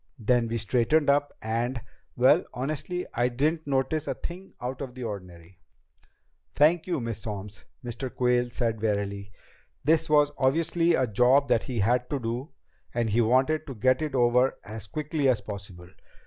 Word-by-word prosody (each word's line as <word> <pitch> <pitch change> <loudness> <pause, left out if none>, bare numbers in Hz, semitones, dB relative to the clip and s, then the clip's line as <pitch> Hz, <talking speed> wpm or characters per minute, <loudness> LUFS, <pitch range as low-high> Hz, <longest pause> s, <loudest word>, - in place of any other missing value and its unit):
Then 120 0 +2
we 115 +1 -2
straightened 125 +8 +2
up, 145 0 +1
and 120 +3 -1 0.4
Well, - - +5
I - - -11
honestly 155 +7 -3
didn't 140 +7 0
notice 140 +3 0
a - - -1
thing 185 +3 -8
out 125 +2 -5
of 130 -3 -6
the 130 - -6
ordinary." 90 -5 -8 1.0
"Thank 160 +4 +4
you, 175 - 0
Miss 115 -3 -4
Solms," 105 -1 -7 0.2
Mr. 120 +2 -5
Quayle 125 -1 +1
said 115 -3 -2
wearily. 100 -2 -2 0.5
This 155 +2 +2
was 150 -1 +4
obviously 165 +5 +2
a 130 - +2
job 125 +5 +3
that 115 - +2
he 125 -6 -2
had 125 +4 +1
to 145 - -1
do, 120 +5 -4 0.5
and 115 -2 0
he 115 +3 +3
wanted 130 +7 +2
to 135 - -6
get 130 +6 +2
it 150 -3 -2
over 125 +1 +3
as 110 -1 -8
quickly 150 - -1
as 120 -4 +2
possible. 100 -4 -9
125 Hz, 165 wpm, -27 LUFS, 110-145 Hz, 1.0 s, Well